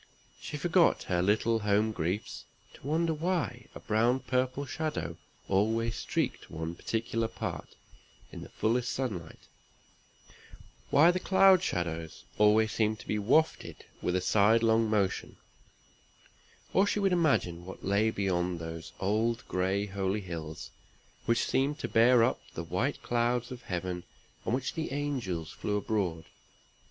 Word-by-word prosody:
She - - -5
forgot - - +3
her 90 -1 0
little 110 +4 +2
home 105 +1 +2
griefs 90 +2 -3 0.3
to - - -11
wonder 160 +2 +1
why 155 -8 -2
a - - -7
brown 115 +4 +2
purple 130 +2 -1
shadow 130 - -3 0.3
always 115 +4 +1
streaked - - -2
one 80 +1 -4
particular 115 +4 -2
part - - -6 0.6
in - - -8
the - - -9
fullest 120 +3 0
sunlight; 100 -12 -4 1.5
why 160 +5 +6
the 185 - -1
cloud 190 0 +5
shadows 85 - -3 0.2
always 110 +1 +5
seemed 110 0 +1
to - - -15
be 105 - 0
wafted 145 +10 +1 0.2
with 90 - 0
a 90 - +1
sidelong 110 +3 +3
motion; 100 -3 0 1.4
or 195 +2 +4
she 205 - 0
would 195 -2 +2
imagine 135 - +1
what 95 +2 -9
lay 100 +3 +2
beyond 90 -4 -1
those 80 0 -7
old 110 +4 0
gray 95 +2 0
holy 100 +1 -2
hills, 80 -4 -7 0.6
which 115 0 +2
seemed 140 +3 +1
to - - -4
bear 120 +1 +5
up 125 - +1
the 85 - -3
white 90 - -2
clouds 120 +1 0
of 125 -1 -7
Heaven 90 -5 -4 0.4
on 115 - +1
which 130 0 -3
the 160 -4 -4
angels 125 - -3
flew 105 0 -2
abroad. 95 -6 -1
110 Hz, 140 wpm, -30 LUFS, 95-125 Hz, 1.5 s, why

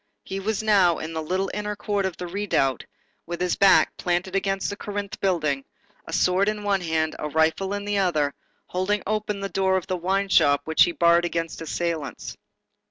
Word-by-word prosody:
He 195 - -5
was 215 +2 -2
now 195 -6 +4
in 160 +1 -6
the 160 - -2
little 185 +4 -1
inner 210 0 -3
court 205 -2 -1
of 185 - -7
the 180 - -5
redoubt, 175 - 0 0.4
with 175 0 -4
his 180 0 0
back 195 -1 +5
planted 180 +2 -1
against 195 0 0
the - - -4
Corinthe 205 -1 -5
building, 155 -8 0 0.4
a - - -7
sword 185 +3 +2
in 210 -1 -4
one 200 -2 +1
hand, 160 -2 -1
a 150 - -3
rifle 160 +5 +1
in 205 0 -5
the 205 -1 0
other, 155 -7 +1 0.3
holding 190 +3 -1
open 210 -1 -2
the 195 - -2
door 190 +1 +1
of 185 - -4
the 185 - -2
wine 195 +3 0
shop 145 -6 +4
which 160 0 +5
he 175 - -1
barred 170 0 +4
against 165 -1 -3
assailants. 165 -2 -3
185 Hz, 195 wpm, -24 LUFS, 165-200 Hz, 0.4 s, back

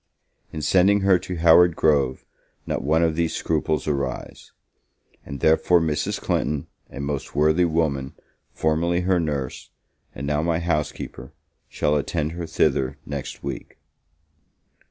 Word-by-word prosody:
In 80 - -5
sending 100 +4 +4
her 95 -2 +4
to 90 - -6
Howard 85 +1 +5
Grove, 70 -5 +1 0.4
not - - -2
one 80 +4 +2
of 80 -2 +1
these 85 -1 0
scruples 80 - -1
arise; 70 -3 -4 0.7
and 70 -2 -8
therefore 80 +2 +4
Mrs. 80 -2 -1
Clinton, 75 -1 -1 0.2
a - - -9
most 70 0 -4
worthy 80 +4 +3
woman, 75 -5 -1 0.4
formerly 85 +3 0
her 90 0 +2
nurse, 70 -6 -3 0.5
and 70 - -5
now 75 +1 0
my 80 0 0
housekeeper, 85 -3 -3 0.4
shall 75 - 0
attend 75 +1 -1
her 85 0 -5
thither 65 -2 +1
next 70 -2 -6
week. - - -6
80 Hz, 135 wpm, -23 LUFS, 70-85 Hz, 0.7 s, Howard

